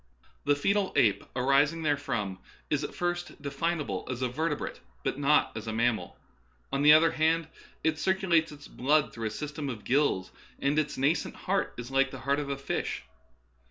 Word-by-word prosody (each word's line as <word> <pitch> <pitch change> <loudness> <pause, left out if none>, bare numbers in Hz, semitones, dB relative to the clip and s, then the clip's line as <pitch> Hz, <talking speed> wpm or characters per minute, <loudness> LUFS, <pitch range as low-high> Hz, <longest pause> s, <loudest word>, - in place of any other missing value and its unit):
The 145 0 +4
foetal 195 +6 +1
ape 105 -4 +3
arising 140 +5 +3
therefrom 115 -10 -1 0.3
is - - +1
at - - -5
first 175 0 -3
definable 150 +3 -2
as 130 0 -3
a 125 - +1
vertebrate, 150 +4 -2 0.2
but 135 - -2
not 145 +1 +3
as 110 +1 -6
a 110 - -2
mammal; 115 -1 0 0.6
on 140 - +1
the 150 +1 +8
other 160 +1 +6
hand, 160 +1 +2 0.4
it 160 -1 +1
cir 190 - +2
culates 170 -4 +2
its 145 -1 -11
blood 150 +4 +1
through 115 -1 -3
a - - -2
system 150 +4 -5
of 115 -5 -6
gills, 130 -9 +1 0.3
and 140 +2 +1
its 150 -1 -2
nascent 140 +5 +1
heart 195 +1 -1
is 120 +2 -7
like 135 0 +3
the 130 -1 -9
heart 140 +2 +1
of 145 -1 -4
a 140 - -2
fish. 135 - -3
145 Hz, 185 wpm, -29 LUFS, 130-160 Hz, 0.6 s, the